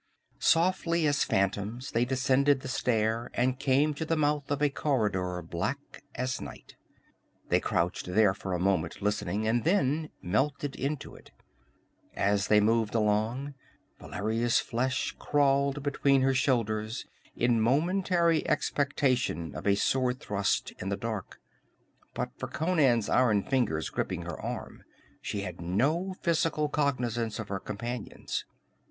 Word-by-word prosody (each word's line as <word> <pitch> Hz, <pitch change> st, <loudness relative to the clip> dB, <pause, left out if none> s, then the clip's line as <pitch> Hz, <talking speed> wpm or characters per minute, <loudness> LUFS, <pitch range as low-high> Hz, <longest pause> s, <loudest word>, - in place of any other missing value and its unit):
Softly 170 Hz, -1 st, +2 dB
as 145 Hz, -1 st, +2 dB
phantoms 100 Hz, +6 st, -1 dB
they 115 Hz, +2 st, +2 dB
descended 135 Hz, +2 st, +2 dB
the -, -, -7 dB
stair 115 Hz, -3 st, 0 dB
and 125 Hz, +1 st, +1 dB
came 140 Hz, +2 st, +2 dB
to 145 Hz, -, -4 dB
the 160 Hz, 0 st, 0 dB
mouth 145 Hz, -2 st, 0 dB
of 145 Hz, -1 st, 0 dB
a 145 Hz, -1 st, +2 dB
corridor 100 Hz, -, -1 dB
black 110 Hz, -, -4 dB
as 130 Hz, +1 st, -2 dB
night. 70 Hz, -4 st, -10 dB, 0.7 s
They -, -, +4 dB
crouched 85 Hz, +1 st, -1 dB
there 95 Hz, +2 st, +4 dB
for 95 Hz, 0 st, -5 dB
a -, -, -2 dB
moment, 90 Hz, -2 st, 0 dB
listening, 105 Hz, 0 st, -1 dB
and 115 Hz, +1 st, +1 dB
then 160 Hz, -4 st, +1 dB
melted 135 Hz, +9 st, -1 dB
into 140 Hz, +1 st, -3 dB
it. -, -, -15 dB, 0.9 s
As 100 Hz, +1 st, +1 dB
they 105 Hz, -, +5 dB
moved 110 Hz, +1 st, +2 dB
along, 110 Hz, +6 st, 0 dB, 0.5 s
Valeria's 115 Hz, +4 st, 0 dB
flesh 130 Hz, +3 st, -1 dB
crawled 140 Hz, -1 st, +2 dB
between 140 Hz, -1 st, +2 dB
her 135 Hz, 0 st, +3 dB
shoulders 115 Hz, -4 st, 0 dB, 0.3 s
in 120 Hz, -1 st, +2 dB
momentary 170 Hz, -, +2 dB
expectation 130 Hz, -, 0 dB
of -, -, -5 dB
a 100 Hz, -, +5 dB
sword 125 Hz, +4 st, +1 dB
thrust 100 Hz, -1 st, -1 dB
in 95 Hz, -, -4 dB
the 100 Hz, -, -1 dB
dark. 110 Hz, -2 st, -5 dB, 0.8 s
But -, -, -2 dB
for -, -, -3 dB
Conan's 145 Hz, -, +2 dB
iron 115 Hz, -5 st, +3 dB
fingers 115 Hz, -, 0 dB
gripping -, -, -2 dB
her -, -, -6 dB
arm -, -, -6 dB, 0.4 s
she 100 Hz, -, -3 dB
had 90 Hz, -3 st, -6 dB
no 145 Hz, -, 0 dB
physical 160 Hz, -3 st, +1 dB
cognizance 120 Hz, -6 st, -1 dB
of 110 Hz, -2 st, -6 dB
her 100 Hz, 0 st, -2 dB
companions. 115 Hz, +3 st, -5 dB
125 Hz, 135 wpm, -29 LUFS, 105-145 Hz, 0.9 s, they